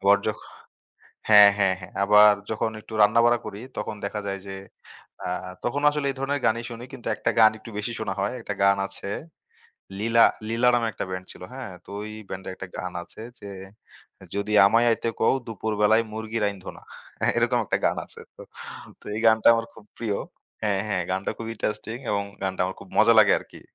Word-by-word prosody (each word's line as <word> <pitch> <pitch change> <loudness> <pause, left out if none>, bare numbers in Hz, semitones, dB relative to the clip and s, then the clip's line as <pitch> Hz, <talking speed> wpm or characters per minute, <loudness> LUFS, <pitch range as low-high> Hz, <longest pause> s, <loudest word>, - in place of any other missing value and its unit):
আবার 100 +1 +5
যখ 105 - -1 0.9
হ্যাঁ, 105 -1 +9
হ্যাঁ, 95 -2 +3
হ্যাঁ 90 - -11
আবার 105 +1 +7 0.2
যখন 110 0 -1
একটু 110 - -15
রান্না-বাড়া 115 +3 +4
করি 105 0 -7 0.2
তখন - - -3
দেখা 105 +1 -3
যায় 100 0 -3
যে 95 - -6 0.7
আ - - -2 0.4
তখনও 145 +4 -1
আসলে 145 -1 -2
এই 135 - -10
ধরনের 140 +1 -1
গানই 115 +1 +1
শুনি 120 +1 -8
কিন্তু 125 -3 -8
একটা - - -1
গান 110 -1 +8
একটু 110 +1 -12
বেশি 105 +3 -3
শোনা 110 -3 -2
হয়, 100 +5 -1
একটা 105 - -4
গান 100 0 +5
আছে 100 0 -8 0.9
'Leela' 115 +3 +5 0.2
'Leela' 120 +2 +3
নামে 120 -1 +1
একটা - - -4
ব্যান্ড 95 0 -5
ছিল, - - -14
হ্যাঁ? 130 -5 -7
তো - - -14
ওই 110 - -7 0.2
ব্যান্ডে 95 +1 -7
একটা 95 - -8
গান 90 -1 -4
আছে 85 - -13 0.2
যে 100 - -8 0.8
'যদি 100 +1 -2
আমায় 115 +4 +4
আইতে 115 0 0
কও 110 - +4
দুপুরবেলায় 110 0 +1
মুরগি 110 +1 -4
রাইন্ধ 100 -2 -3
না।' - - -17 0.3
হ্যাঁ, - - +2
এরকম - - +2
একটা - - 0
গান - - +2
আছে। - - -10 0.2
তো, - - -11 0.6
তো - - -22
এই 110 - -3
গানটা 110 0 +5
আমার 115 0 -1
খুব 105 - -15
প্রিয় 110 -4 -2 0.5
হ্যাঁ, 100 -2 +1
হ্যাঁ 90 -3 0
গানটা 95 +1 -1
খুব 115 - -6
ইন্টারেস্টিং 105 +1 -3
এবং 100 -1 +1 0.2
গানটা 95 -1 -2
আমার 95 +1 -4
খুব - - -12
মজা 110 +2 +7
লাগে 105 -2 +7
আরকি। - - -14
105 Hz, 195 wpm, -25 LUFS, 100-115 Hz, 0.9 s, হ্যাঁ